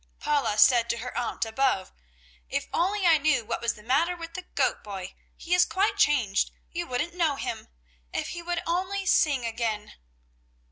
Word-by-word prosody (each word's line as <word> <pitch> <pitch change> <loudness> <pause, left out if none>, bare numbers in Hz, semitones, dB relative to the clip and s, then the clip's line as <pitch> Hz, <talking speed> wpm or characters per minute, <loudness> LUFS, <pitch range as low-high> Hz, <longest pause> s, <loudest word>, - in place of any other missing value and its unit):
Paula 280 -8 0
said 235 +1 +5
to 235 - 0
her 250 +2 -6
aunt 240 -1 -1
above: 225 -3 0 0.6
"If - - -1
I - - 0
only 355 -3 +3
knew 300 -6 +2
what - - -3
was 235 0 0
the 210 - -15
matter 300 +9 +2
with 335 -1 -8
the 370 - -5
goat - - +1
boy! 195 -3 -7 0.2
He 345 - -3
is 360 0 +6
quite 400 +3 +1
changed. 270 - +2 0.2
You 345 0 -4
wouldn't 255 +8 -2
know 330 -5 +1
him. - - -5 0.4
If - - -3
he 345 - -6
would 345 0 -3
only 375 +3 -1
sing 285 -8 +3
again!" 225 -2 -3
290 Hz, 180 wpm, -27 LUFS, 230-345 Hz, 0.6 s, is